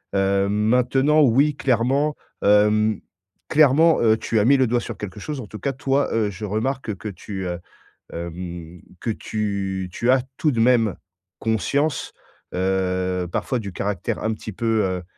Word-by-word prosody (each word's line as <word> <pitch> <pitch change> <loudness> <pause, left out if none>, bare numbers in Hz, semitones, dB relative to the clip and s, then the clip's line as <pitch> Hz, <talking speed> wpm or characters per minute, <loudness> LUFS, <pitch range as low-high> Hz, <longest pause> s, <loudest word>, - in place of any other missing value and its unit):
Heu 100 0 +2
maintenant, 125 +8 +3
oui, 140 +2 +4
clairement, 135 +5 +1 0.3
hem, 105 +1 +4 0.5
clairement, 155 +2 +5
heu, 110 -1 +4
tu 110 - 0
as 105 - +2
mis 140 +3 +5
le 130 -2 +3
doigt 120 +1 +1
sur - - -7
quelque 105 0 -7
chose. 150 +2 -5
En 110 - -9
tout 105 - -9
cas, 140 - -1
toi, 135 +2 0
heu, 110 -2 +1
je 100 +2 -10
remarque 110 +2 -2
que 100 - -8
tu, 95 0 -6
heu, 90 -1 -4 0.5
hem, 85 0 -7 0.2
que 115 - -2
tu 100 -4 -3
tu 120 +5 +1
as 130 0 +4
tout 150 - +1
de 115 - 0
même 115 -4 +3 0.5
conscience, 130 - 0 0.4
heu, 95 -1 0
parfois, 130 - -1
du 100 -4 -6
caractère 100 0 -3
un 110 - 0
petit 110 0 -8
peu, 110 +1 0
heu, 95 -1 -2
110 Hz, 165 wpm, -22 LUFS, 95-130 Hz, 0.5 s, clairement